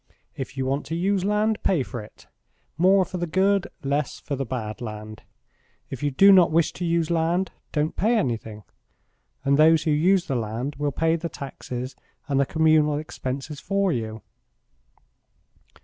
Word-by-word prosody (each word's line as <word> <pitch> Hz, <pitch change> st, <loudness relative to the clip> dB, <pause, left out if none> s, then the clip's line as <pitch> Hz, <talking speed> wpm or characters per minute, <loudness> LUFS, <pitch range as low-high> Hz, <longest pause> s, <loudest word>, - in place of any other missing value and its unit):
If 135 Hz, 0 st, -6 dB
you 130 Hz, -, -1 dB
want 135 Hz, +2 st, -2 dB
to 165 Hz, -, -3 dB
use 190 Hz, +2 st, +1 dB
land 210 Hz, +2 st, +1 dB
pay 170 Hz, -8 st, +2 dB
for 125 Hz, -2 st, -6 dB
it 105 Hz, -, -15 dB, 0.5 s
more 185 Hz, +4 st, +4 dB
for 180 Hz, -, -6 dB
the 175 Hz, -, -2 dB
good, 190 Hz, +3 st, +2 dB, 0.2 s
less 140 Hz, 0 st, -1 dB
for 140 Hz, -, -4 dB
the 135 Hz, -1 st, -4 dB
bad 110 Hz, -3 st, -5 dB
land. 110 Hz, -2 st, -7 dB, 0.7 s
If 130 Hz, -, -6 dB
you 145 Hz, -, +1 dB
do 195 Hz, +9 st, +6 dB
not 185 Hz, -3 st, +7 dB
wish 165 Hz, 0 st, +2 dB
to 180 Hz, -, -4 dB
use 170 Hz, -1 st, 0 dB
land, 170 Hz, +3 st, +1 dB, 0.2 s
don't 150 Hz, 0 st, -1 dB
pay 225 Hz, +4 st, +2 dB
anything, 110 Hz, -, -3 dB, 0.8 s
and 140 Hz, 0 st, +3 dB
those 160 Hz, 0 st, +6 dB
who 155 Hz, -, +1 dB
use 175 Hz, +5 st, +3 dB
the -, -, -3 dB
land 120 Hz, +5 st, -3 dB
will 145 Hz, 0 st, -1 dB
pay 165 Hz, +3 st, +1 dB
the 170 Hz, +1 st, -4 dB
taxes 130 Hz, -3 st, -7 dB, 0.3 s
and 140 Hz, -1 st, +1 dB
the 140 Hz, -, +2 dB
communal 155 Hz, -2 st, +3 dB
expenses 140 Hz, -1 st, -5 dB
for 195 Hz, +1 st, 0 dB
you." 110 Hz, -5 st, -4 dB
150 Hz, 170 wpm, -24 LUFS, 130-175 Hz, 0.8 s, not